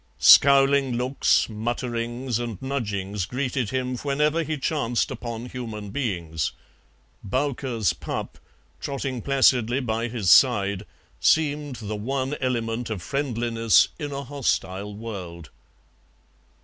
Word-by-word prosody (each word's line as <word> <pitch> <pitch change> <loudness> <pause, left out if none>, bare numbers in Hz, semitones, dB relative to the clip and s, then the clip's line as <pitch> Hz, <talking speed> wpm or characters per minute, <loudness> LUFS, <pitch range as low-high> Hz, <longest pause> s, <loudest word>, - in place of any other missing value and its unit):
Scowling 135 -2 +6
looks, 125 +3 +2
mutterings, 120 +2 -3
and 115 -5 -4
nudgings 105 -7 -3
greeted 125 -2 -2
him 130 -1 -2
whenever 150 +4 +1
he 155 -1 -3
chanced 135 -5 -1
upon 115 -1 -5
human 110 -5 -6
beings; 85 - -2 0.7
"Bowker's 125 - -1
pup," - - -6 0.4
trotting 135 -3 -4
placidly 130 -2 +3
by 115 -2 -1
his 110 -6 +1
side, 100 -6 +4 0.3
seemed 145 - +2
the 110 -2 -5
one 130 +6 -2
element 120 -2 -1
of 100 -6 -4
friendliness 115 - +2
in 145 -1 -4
a 140 0 -4
hostile 105 -7 -2
world. 90 -8 -8
120 Hz, 110 wpm, -24 LUFS, 105-135 Hz, 0.7 s, Scowling